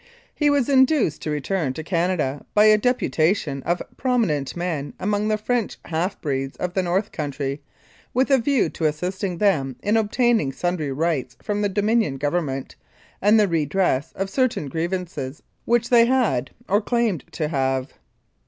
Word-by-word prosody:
He 295 -1 +2
was 285 -4 +2
induced 265 - +3
to - - -4
return 150 0 -1
to 160 - -6
Canada 165 -5 -1
by 210 0 +6
a 215 0 +7
deputation 170 - +1
of 175 +1 0
prominent 215 - 0
men 170 -5 -3
among 205 +2 0
the 215 0 +1
French 230 +1 -1
half 170 +4 -2
breeds 135 -2 -2
of 180 -1 -3
the 190 - +1
North 185 +4 0
Country, 140 -2 -4 0.5
with 260 +3 +1
a 270 - +6
view 275 +2 +2
to 160 - -4
assisting 180 +4 -2
them 150 -11 +1
in 210 +2 +2
obtaining 225 - +2
sundry 175 -4 -2
rights 135 -4 -1
from 205 0 -1
the 205 - +1
Dominion 205 -6 +1
Government, 145 -2 -2 0.5
and 210 +3 +5
the 210 - +4
redress 160 -3 0
of 195 0 -3
certain 255 - 0
grievances 165 -4 -4 0.2
which 235 0 +2
they 235 -1 +7
had, 235 - +1 0.2
or 205 +2 +2
claimed 225 - 0
to 155 - -1
have. 135 -2 -1
180 Hz, 160 wpm, -23 LUFS, 145-215 Hz, 0.5 s, a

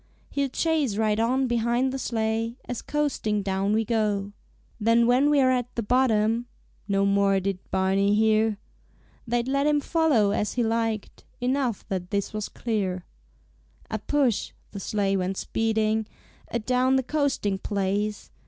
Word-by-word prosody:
He'll 280 -1 0
chase 295 -6 0
right 215 -1 +1
on 255 +4 +2
behind 240 +2 +1
the 270 - -3
sleigh, 225 -1 -1
As 245 -2 -4
coasting 265 -9 -1
down 195 +1 0
we 220 +1 +2
go. 210 -3 0 0.5
"Then 230 +2 +4
when 255 +4 +4
we're 275 -3 +4
at 250 -2 0
the 235 - -1
bottom 230 -1 +2 0.2
" - - -37
No 200 -1 +2
more 200 0 +3
did 195 -1 -2
Barney 195 +2 +2
hear. 220 0 +3 0.7
They'd 240 +1 0
let 275 +2 +1
him 300 -1 +3
follow 290 -10 +2
as 210 0 -1
he 245 - 0
liked, 225 -2 -2 0.2
Enough 250 -3 -1
that 180 -2 -3
this 200 0 -2
was 215 -1 -3
clear. 190 -6 -2 0.9
A - - -1
push 275 -7 0 0.2
the 200 - -6
sleigh 195 0 0
went 190 0 -1
speeding 220 -1 0 0.4
Adown 250 +3 +1
the 265 - +2
coasting 260 -9 0
place. 205 +1 -2
220 Hz, 150 wpm, -26 LUFS, 205-250 Hz, 0.9 s, Then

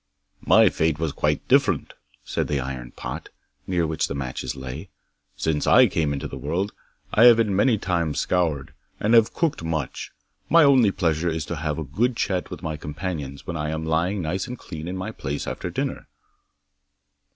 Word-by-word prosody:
'"My - - +6
fate 80 -1 0
was 80 -1 -1
quite - - -1
different," - - +2 0.3
said - - -2
the 75 - 0
iron 65 -2 -5
pot, - - -7 0.4
near 90 -3 +1
which 80 0 -1
the - - -4
matches 65 -1 -4
lay. 65 +7 -7 0.5
'"Since 75 0 0
I - - +7
came 80 -3 0
into 70 - -3
the - - -8
world 95 +5 -2 0.4
I 115 - +6
have 120 -2 +9
been 105 -4 +1
many 110 +3 +3
times 85 -6 -1
scoured, 80 -7 0 0.3
and 110 +3 +1
have 115 -2 +5
cooked 160 - 0
much. 80 -5 -3 0.4
My 170 -1 +7
only 130 -7 +6
pleasure 85 -3 0
is 80 -1 -2
to 85 - -4
have 75 0 -2
a 80 - -2
good 110 - 0
chat 95 -5 -1
with - - -8
my 80 -1 -3
companions 75 -2 -5
when 85 - -4
I 75 -1 -2
am 80 0 -3
lying 85 +5 0
nice 95 +8 -2
and 125 0 -6
clean 80 -5 -8
in 95 +1 -4
my 95 - -4
place 70 +1 -4
after - - -4
dinner." - - -3
80 Hz, 185 wpm, -24 LUFS, 75-95 Hz, 0.5 s, have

